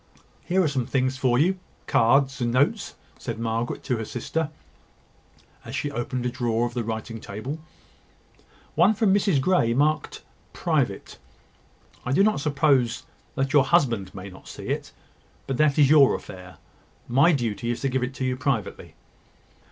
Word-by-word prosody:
"Here 185 +1 +2
are - - +2
some 130 -5 -1
things 130 -1 0
for 125 -2 +2
you, 185 +7 +2 0.3
cards 135 +3 +3
and 120 -1 +1
notes," 145 - +1 0.2
said 115 -2 -5
Margaret 115 +1 -2
to 125 - -1
her 110 - -3
sister, 150 +8 -3 1.1
as - - -7
she 145 - -2
opened 125 -1 -3
a 125 - 0
drawer 120 -1 0
of 120 - -4
the 120 -1 -2
writing 115 +1 -5
table: 125 +10 -6 1.1
"one 180 +7 +4
from 210 -3 +3
Mrs 195 -7 +2
Grey, 130 -7 +2
marked 150 +3 0 0.3
`Private.' - - -1 0.9
I 125 - -1
do 195 - +4
not 215 -4 +2
suppose 140 -5 +2 0.5
your 140 -2 +5
husband 120 - +1
may 95 0 -7
not 95 -1 -13
see - - -8
it; - - -3 0.5
but 135 - -3
that 150 0 +3
is 145 -2 +5
your 145 -4 +6
affair. 90 -1 -10 0.5
My 140 +8 +4
duty 120 -5 -1
is 120 - -2
to 135 - 0
give 130 0 -1
it 125 0 -4
you 130 -1 0
privately." 130 -5 -3
130 Hz, 160 wpm, -25 LUFS, 120-150 Hz, 1.1 s, your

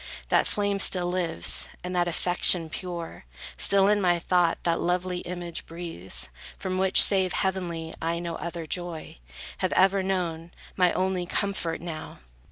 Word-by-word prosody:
That - - +2
flame 205 -1 -1
still 180 -2 +4
lives, 175 -3 +3
and 180 0 -5
that 175 -1 +1
affection 175 -1 +2
pure; 170 - -7 0.3
Still 195 -1 +3
in 205 0 +2
my 175 -2 +2
thought 175 0 +1
that 165 -1 0
lovely 180 0 -1
image 175 -2 -6
breathes, 95 - -5 0.3
From 185 -1 -3
which, 190 0 +5
save 190 -2 +3
heavenly, 175 -4 -3
I 165 +1 -1
no 170 -1 -5
other 170 -1 -6
joy, 170 - -5 0.4
Have - - -1
ever 195 +1 +3
known; 175 -3 -3 0.2
my 180 -2 +3
only 185 -1 -1
comfort, 190 -5 -2
now! 165 -2 -8
175 Hz, 150 wpm, -26 LUFS, 170-185 Hz, 0.4 s, which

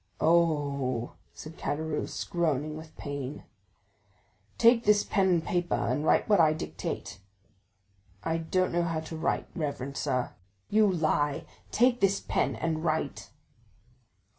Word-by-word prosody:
"Oh!" 145 -7 +1 0.2
said 155 +1 -11
Caderousse, 155 +1 -2
groaning 155 -3 0
with 160 0 -11
pain. 145 -1 -5 1.1
"Take 235 0 +5
this 210 -2 +4
pen 195 -2 +2
and 170 -3 +2
paper, 175 -1 0
and 145 - -1
write - - +3
what 205 -3 +4
I 155 -2 +5
dictate." 80 - -5 1.0
"I 165 0 0
don't 185 +3 0
know 175 - +2
how 165 -2 -1
to 160 +1 -7
write, 160 - -1
reverend 140 -3 -4
sir." 125 -4 -1 0.4
"You 210 -1 +5
lie! 155 -4 0 0.2
Take 245 +1 +3
this 195 0 +3
pen, - - 0
and 160 -1 -2
write!" 160 -1 -2
160 Hz, 130 wpm, -29 LUFS, 145-175 Hz, 1.1 s, Take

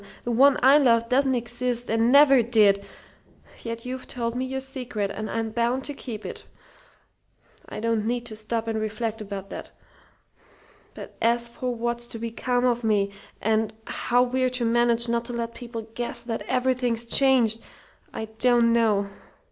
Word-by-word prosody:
The 240 - -2
one 270 +4 +5
I 275 +3 +7
loved 230 -4 +3
doesn't 265 0 +2
exist 240 0 -3
and 225 +2 +2
never 275 -2 +7
did; 210 -4 +3 0.8
yet 230 0 -6
you've 255 +1 -6
told 235 -2 -3
me 255 +1 -1
your 265 +1 -3
secret, 250 -6 -3
and 215 0 -5
I'm 225 -1 -2
bound 235 +3 0
to 290 - -4
keep 230 -6 -7
it. - - -7 1.3
I - - -6
don't 225 -1 0
need 240 0 -2
to 225 -2 -7
stop 225 +1 -3
and 220 -1 -1
reflect 220 +1 -3
about 195 -1 -7
that. - - -7 1.3
But - - -10
as 235 +1 +2
for 250 0 -4
what's 235 +1 -2
to 235 - -7
become 245 +2 -1
of 240 -1 +1
me, 205 -3 +1 0.3
and 220 0 +1
how 245 +1 +1
we're 255 +1 0
to 250 -1 -2
manage 235 0 +2
not 235 0 0
to 245 - -5
let 235 0 -3
people 235 -2 -7
guess 240 +1 -3
that 230 -1 -4
everything's 250 -2 0
changed, 235 -3 +4 0.5
I 220 - -5
don't 240 -1 +4
know! 215 -4 +2
235 Hz, 165 wpm, -25 LUFS, 225-250 Hz, 1.3 s, I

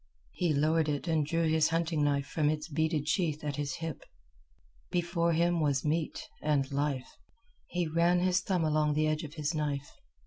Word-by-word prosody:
He 175 -3 0
lowered 155 +2 +2
it 145 +3 -2
and 160 -2 +2
drew 165 +3 0
his 160 0 +3
hunting 165 -2 0
knife 140 -1 +1
from 150 0 0
its 155 0 -2
beaded 160 -1 0
sheath 155 -3 0
at 145 -1 -3
his 140 -2 -2
hip. 165 -1 -5 0.9
Before 170 -1 +1
him 170 +1 +2
was 145 -3 +1
meat 155 +1 -1
and 140 -3 +1
life. 140 -2 -2 0.5
He 175 0 -1
ran 170 +3 +3
his 185 +1 +2
thumb 180 -2 0
along 155 -1 +2
the 155 +1 +2
edge 155 +1 0
of 150 0 -8
his 150 0 -1
knife. 145 -2 -2
155 Hz, 180 wpm, -31 LUFS, 150-170 Hz, 0.9 s, his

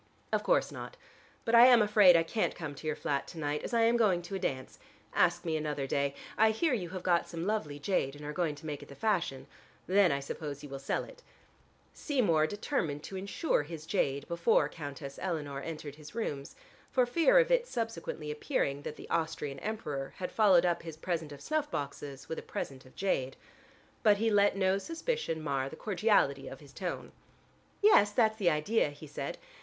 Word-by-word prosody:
"Of - - +3
course - - +2
not. - - -8 0.5
But 230 - -1
I 235 +1 +10
am 245 -2 +8
afraid 205 -4 +6
I 165 - +3
can't 215 +6 -1
come 155 -4 -5
to 150 +3 -8
your 155 - 0
flat 140 -2 -2
to 170 - -10
night, 150 -1 -2
as - - -4
I 235 -1 +3
am 230 +1 +4
going 190 -7 +3
to 175 - -8
a 195 - -1
dance. 130 -8 -4 0.3
Ask 175 0 +2
me 160 -2 0
another 150 -3 -2
day. 140 +1 0 0.2
I 220 0 +6
hear 265 +7 +1
you 185 -8 -2
have 185 0 -6
got 175 -2 +2
some 170 0 -4
lovely 195 -9 -1
jade 145 -3 -1
and 145 0 -10
are 150 - -4
going 160 -3 -1
to 145 - -13
make 150 -2 -4
it - - -12
the 140 - -10
fashion. 175 -11 -1 0.4
Then 190 -2 +4
I 140 - 0
suppose 145 0 -6
you 145 - -8
will 135 0 -6
sell 135 - -1
it." - - -13 0.7
Seymour 190 - +2
determined 170 - -2
to 195 - -7
insure 200 - 0
his 155 +1 -8
jade 140 -7 0
before 170 -1 +2
Countess 140 -3 -8
Eleanor 150 -6 -3
entered 155 -2 -7
his 155 +5 -12
rooms, 145 -12 -4 0.3
for 255 -2 +3
fear 335 - +4
of - - +4
its - - +2
subsequently 165 -9 -4
appearing 140 -1 -1
that 150 - -6
the - - -11
Austrian 160 -4 -2
Emperor 150 -11 -4
had 180 - -4
followed 190 -5 +5
up 170 -1 +1
his 165 -2 -8
present 160 -2 -3
of 140 -1 -10
snuff 305 -1 -1
boxes 140 - -5
with 160 - -4
a - - -7
present 130 -1 -6
of 130 - -19
jade. 135 -9 -1 0.6
But 210 -2 +5
he 225 +2 +1
let 205 -1 +4
no 190 0 +2
suspicion 330 - -3
mar 135 -2 -1
the 160 - -9
cordiality 185 -8 +1
of 135 - -8
his 140 -2 -16
tone. 180 +3 -5 0.7
"Yes, 410 - +7
that's 220 0 +2
the 190 -5 +3
idea," 155 +5 +1
he 145 +2 -11
said. 145 0 -5
170 Hz, 205 wpm, -31 LUFS, 145-210 Hz, 0.7 s, I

